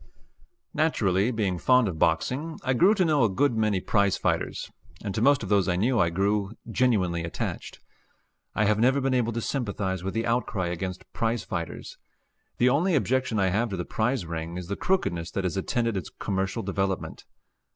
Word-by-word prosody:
Naturally, 105 - +2
being 100 -7 -1
fond 125 +1 +4
of 85 -5 -4
boxing, 130 - 0
I 130 - +1
grew 185 - +5
to 185 -3 +2
know 150 -5 +3
a 115 - +3
good 120 +6 +1
many 110 -3 +1
prize 100 +1 +1
fighters, - - -2 0.3
and 100 - -3
to 110 - -2
most 140 0 +4
of 100 - -5
those 100 -3 +3
I 90 - +1
knew 115 +7 +2
I 85 - +3
grew 100 +3 0 0.2
genuinely 100 -9 +1
attached. 85 - -5 0.8
I 105 - +2
have 105 +1 +2
never 130 +4 +4
been 135 -1 0
able 120 -2 +1
to 115 - -2
sympathize 100 -8 -2
with 95 +2 -4
the 115 0 0
outcry 115 -6 -1
against 90 +1 -5
prize 115 -1 -1
fighters. 85 -3 -6 0.6
The 125 - +3
only 160 +8 +3
objection 130 -4 +1
I 95 -1 +3
have 110 +6 0
to 95 - -4
the 90 - -3
prize 115 -2 -1
ring 85 +1 -5
is 90 -1 -7
the 100 - -1
crookedness 85 - -1
that 100 - -1
has 90 0 -1
attended 115 +3 -1
its 95 -5 -4
commercial 95 -1 -3
development. 95 0 -3
105 Hz, 190 wpm, -26 LUFS, 95-125 Hz, 0.8 s, grew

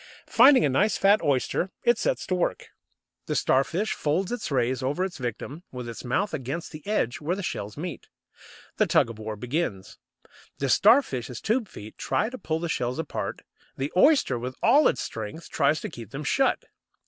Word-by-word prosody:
Finding 260 +2 +6
a - - +2
nice 195 +11 +2
fat 200 +2 +4
oyster, 140 +6 0
it 240 -1 +3
sets - - -1
to - - -2
work. 180 -1 -1 0.6
The - - -1
Starfish 165 +11 +1
folds 175 +7 -1
its 245 - -3
rays 130 -1 0
over 145 +8 0
its 180 -5 -7
victim, 130 +5 -5
with 125 -2 -6
its 115 - -7
mouth 190 +11 -1
against 145 +3 -4
the 155 - -9
edge 180 - 0
where 165 +5 -1
the 200 - -5
shells 105 - -4
meet. 160 -4 -6 0.7
The - - +3
tug 115 - +3
of 110 - -12
war 110 0 -5
begins. 120 - -3 0.6
The 135 - -1
Starfish's 135 - +3
tube 225 0 0
feet 110 - -11
try 220 - 0
to 255 - -7
pull 160 -5 -2
the 170 +1 -3
shells 125 -5 -2
apart; 160 -2 -4 0.3
the 135 +2 -3
oyster, 190 - +4
with 125 +2 -5
all 280 +7 +6
its - - 0
strength, 110 +9 -6
tries 155 +1 +2
to - - -4
keep 115 -4 -10
them 140 +2 -6
shut. 270 - +1
150 Hz, 185 wpm, -26 LUFS, 125-195 Hz, 0.7 s, Finding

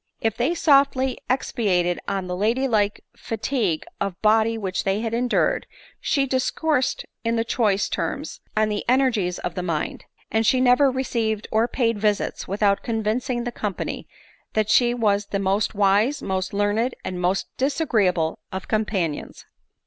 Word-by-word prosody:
If 225 -1 0
they 255 +8 +1
sofdy 275 -4 +3
expatiated 185 -9 +1
on 195 -2 -2
the 180 0 -3
lady 230 +8 +1
like 210 -4 +1
fatigue 220 - -1 0.2
of 195 -3 -3
body 220 +1 +3
which 190 -4 -2
they 195 +2 0
had 225 -1 -3
endured, 250 - +1 0.3
she 275 -1 +1
discoursed 265 +1 0 0.2
in 230 0 +1
choice 215 -4 +1
terms - - -3 0.2
on 215 0 +3
the 210 -1 -2
energies 245 -9 +2
of 175 - -4
the 180 - -3
mind; 165 -4 -3 0.3
and 220 0 +2
she 255 +4 +3
never 255 +2 +5
re 260 0 -1
ceived 220 -4 -1
or 220 +2 +3
paid 230 -3 0
visits 210 -1 0
without 200 0 +1
convincing 235 +2 -1
the 245 - -3
company 210 -4 -4 0.5
that 215 0 +1
she 240 +1 +4
was 205 -3 +1
the 200 - -2
most 200 +2 0
wise, 205 +7 +3
most 190 -1 -2
learned, 205 +5 0
and 180 -1 -4
most 180 +2 -1
disagree 270 - +2
able 165 -3 0
of 190 0 -5
companions. 195 -8 -2
220 Hz, 155 wpm, -23 LUFS, 200-245 Hz, 0.5 s, never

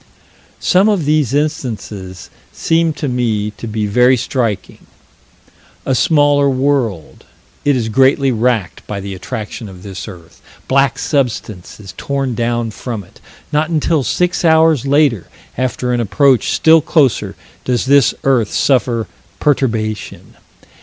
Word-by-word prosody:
Some 190 +4 +3
of 195 -8 0
these 150 -4 +1
instances 115 - -4 0.2
seem 165 0 +1
to 150 - -4
me 115 -5 -1
to 110 +2 -9
be 110 -1 -2
very 125 +5 +3
striking 115 -4 -3 1.0
a 135 - 0
smaller 145 +1 +3
world: 130 - -1 0.4
it 145 -1 +2
is 120 -3 -1
greatly 135 +4 +3
racked 115 -5 -1
by 100 - -4
the 100 0 -6
attraction 110 +2 -6
of 90 -1 -13
this 95 0 -7
earth 90 -5 -13 0.3
black 135 -1 +2
substance 115 - -3
is 100 -2 -10
torn 135 -2 -2
down 120 0 -1
from 110 -2 -6
it 100 +5 -21 0.3
not 155 +2 +1
until 160 -1 +1
six 180 +7 -1
hours 160 -4 +3
later, 140 - +2 0.3
after 125 0 -2
an 120 - 0
approach 120 +3 +2
still 160 0 +4
closer, 145 -6 +1 0.3
does 125 0 -1
this 140 -2 +4
earth 125 -6 +1
suffer 120 -4 +1 0.3
perturbation. 115 -7 -2
125 Hz, 135 wpm, -16 LUFS, 110-145 Hz, 1.0 s, still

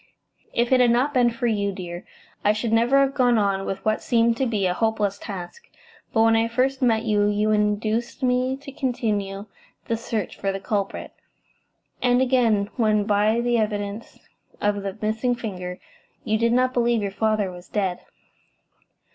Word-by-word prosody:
"If 235 +1 0
it 260 - +5
had 245 -1 +5
not 250 +5 +2
been 245 -3 +4
for 235 +1 -4
you, 205 -3 +1
dear, 175 -2 -7 0.4
I 210 - +4
should 220 +1 -2
never 235 +4 +4
have 275 0 +1
gone 250 -4 +3
on 195 -2 0
with 195 0 -5
what 215 0 +1
seemed 230 -1 +2
to 265 - +1
be 210 -4 0
a 180 - +1
hopeless 210 -1 0
task. 200 - -8 0.4
But 225 - +3
when 225 0 +4
I 225 0 +2
first 260 +3 0
met 225 -3 +2
you 210 -2 +2
you 210 +1 +1
induced 215 +4 0
me 255 +1 +1
to 275 0 -10
continue 210 -7 -2 0.4
the 230 - -1
search 225 -3 -4
for 195 - 0
the 195 - -4
culprit, 200 0 -3 0.9
and 245 0 +3
again 235 -6 +2
when, 215 -3 +2
by 210 +2 +2
the 240 -1 +1
evidence 210 0 -3 0.4
of 205 0 0
the 195 +1 -5
missing 220 +4 0
finger, 180 -6 -6 0.4
you 220 -1 0
did 230 0 +2
not 255 +1 +2
believe 235 -3 +1
your 200 - -2
father 215 -1 0
was 175 0 -12
dead." 190 -4 -1
220 Hz, 175 wpm, -23 LUFS, 205-240 Hz, 0.9 s, it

